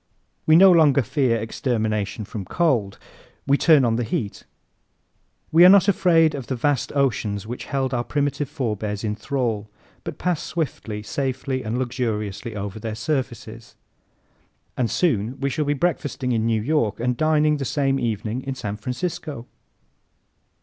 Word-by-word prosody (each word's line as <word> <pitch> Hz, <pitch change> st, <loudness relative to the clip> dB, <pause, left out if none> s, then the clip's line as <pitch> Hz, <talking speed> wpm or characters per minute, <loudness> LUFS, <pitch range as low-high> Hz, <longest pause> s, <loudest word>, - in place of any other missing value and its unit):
We 155 Hz, -, +6 dB
no 190 Hz, +3 st, +8 dB
longer 150 Hz, -6 st, +5 dB
fear 125 Hz, 0 st, +1 dB
extermination 110 Hz, -2 st, -2 dB
from 105 Hz, -1 st, -6 dB
cold. 115 Hz, -, 0 dB, 0.5 s
We 140 Hz, -, +4 dB
turn 150 Hz, -3 st, +5 dB
on 115 Hz, -1 st, +1 dB
the 120 Hz, -, 0 dB
heat. 105 Hz, -2 st, -4 dB, 1.1 s
We 165 Hz, +2 st, +7 dB
are 180 Hz, -, +10 dB
not 195 Hz, -1 st, +6 dB
afraid 165 Hz, -5 st, +4 dB
of 135 Hz, -4 st, -6 dB
the 130 Hz, -, -2 dB
vast 135 Hz, +1 st, 0 dB
oceans 110 Hz, -7 st, 0 dB
which 120 Hz, +3 st, -6 dB
held 135 Hz, -2 st, -2 dB
our 120 Hz, -1 st, 0 dB
primitive 145 Hz, 0 st, -1 dB
forebears 110 Hz, -7 st, -3 dB
in 105 Hz, -1 st, -1 dB
thrall, 110 Hz, -3 st, -2 dB, 0.3 s
but -, -, -6 dB
pass 180 Hz, -4 st, -1 dB
swiftly, 115 Hz, -9 st, -4 dB
safely 130 Hz, +2 st, -2 dB
and 115 Hz, 0 st, -3 dB
luxuriously 115 Hz, -4 st, -3 dB
over 100 Hz, +1 st, -5 dB
their 110 Hz, 0 st, -4 dB
surfaces. 115 Hz, -3 st, -4 dB, 1.0 s
And 120 Hz, -3 st, 0 dB
soon 125 Hz, -, 0 dB
we 140 Hz, 0 st, -1 dB
shall 150 Hz, +2 st, -1 dB
be 145 Hz, +1 st, +1 dB
breakfasting 145 Hz, -5 st, -1 dB
in 115 Hz, -1 st, +1 dB
New 110 Hz, -2 st, +1 dB
York 115 Hz, -7 st, 0 dB
and 125 Hz, +1 st, 0 dB
dining 155 Hz, +1 st, +2 dB
the 140 Hz, -, -3 dB
same 135 Hz, +1 st, 0 dB
evening 115 Hz, 0 st, -2 dB
in 135 Hz, 0 st, -5 dB
San 105 Hz, -5 st, -5 dB
Francisco! 140 Hz, -, -4 dB
125 Hz, 155 wpm, -23 LUFS, 110-145 Hz, 1.1 s, are